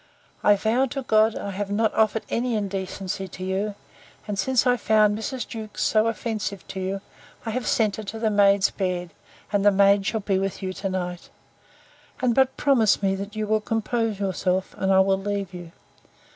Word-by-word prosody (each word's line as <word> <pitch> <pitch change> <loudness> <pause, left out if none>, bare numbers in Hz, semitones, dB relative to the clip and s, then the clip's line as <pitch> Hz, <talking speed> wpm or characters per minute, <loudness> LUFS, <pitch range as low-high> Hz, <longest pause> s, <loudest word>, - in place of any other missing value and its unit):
I 205 - +6
vow 225 +6 +1
to 270 +1 -5
God, 220 -1 +3
I 200 - -4
have 200 +1 -4
not 215 +2 +1
offered 220 0 +2
any 240 0 -1
indecency 195 -1 -3
to 185 +1 -9
you: 195 +2 -2 0.5
and, 205 -2 -3
since 255 +4 +2
I 250 -1 +4
found 215 -3 +3
Mrs. 245 +4 -4
Jewkes 220 -2 -5
so 215 0 +3
offensive 215 -4 -3
to 190 - -5
you, 190 +1 -3 0.4
I 225 - -2
have 250 +2 -3
sent 215 -3 +1
her 215 - -5
to 220 +3 -6
the 220 -1 0
maid's 200 -1 +4
bed, 180 -3 -3 0.4
and 200 -1 +2
the 205 - +7
maid 200 0 +4
shall 220 0 -1
be 195 -1 0
with 195 +1 -3
you 185 0 -2
to 195 +1 -4
night. 180 -2 -4 0.9
And 250 -2 +2
but 265 +1 +2
promise 230 -8 +3
me, 195 0 +2
that 200 +2 -6
you 215 0 -1
will 215 0 +1
compose 225 -1 -1
yourself, 190 -1 -1
and 190 0 +1
I 190 0 +6
will 190 0 +2
leave 200 -1 -3
you. 175 -2 -9
205 Hz, 195 wpm, -24 LUFS, 195-220 Hz, 0.9 s, the